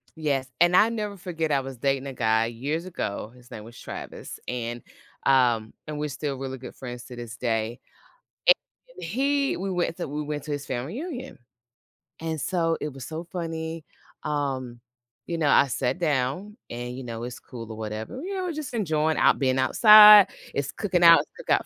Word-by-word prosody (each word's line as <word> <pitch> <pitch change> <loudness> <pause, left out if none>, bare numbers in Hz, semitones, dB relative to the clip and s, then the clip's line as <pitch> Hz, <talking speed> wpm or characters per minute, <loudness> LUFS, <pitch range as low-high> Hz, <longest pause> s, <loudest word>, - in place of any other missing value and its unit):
Yes, 140 -4 -1
and 175 +1 +5
I 215 +4 +6
will 230 - -4
never 210 -1 -3
forget, 165 -4 -3
I 140 - +2
was 135 -1 -8
dating 135 +1 0
a 135 - -5
guy, 110 -1 +2
years 145 +9 -3
ago, 110 - -4
his 125 -1 -18
name 105 - -8
was 115 +2 -13
Travis, - - -8
and, 120 -1 -4 0.4
um 120 -5 +3
and 150 -1 -5
we're 150 - -1
still 140 0 -4
really 135 0 -5
good 125 - -10
friends 125 -2 -8
to 125 - -11
this 120 -2 -8
day 115 0 -1 0.7
and - - +9 0.5
he 280 +2 0
we 190 +1 -3
went 175 -2 -1
to 175 - -4
we 150 +2 -4
went 150 -1 -4
to - - -8
his 145 -1 -3
family 130 - -4
reunion. 275 -6 -7 0.8
And 160 -1 -3
so 165 +2 0
it 150 - -4
was 130 -2 -8
so 160 +4 -6
funny, 165 -2 -5 0.4
um, 135 -5 -3 0.5
you 170 - -2
know, 150 -3 +1
I 140 - +5
sat 130 +5 -1
down, 155 - -1
and, 120 +1 -5
you 130 - -6
know, 115 -1 -6
it's 125 0 -6
cool 115 -3 -9
or 110 - -8
whatever. 110 - -5
You 390 +4 -4
know, 375 - -2
we're 350 - -2
just 300 -4 -6
enjoying 160 -8 0
out - - +4
being 130 -1 +1
outside, 210 - +9 0.3
it's 140 -1 -1
cooking 180 -2 0
out 170 0 +9 0.2
cook - - -12
out - - +3
145 Hz, 195 wpm, -26 LUFS, 125-175 Hz, 0.8 s, and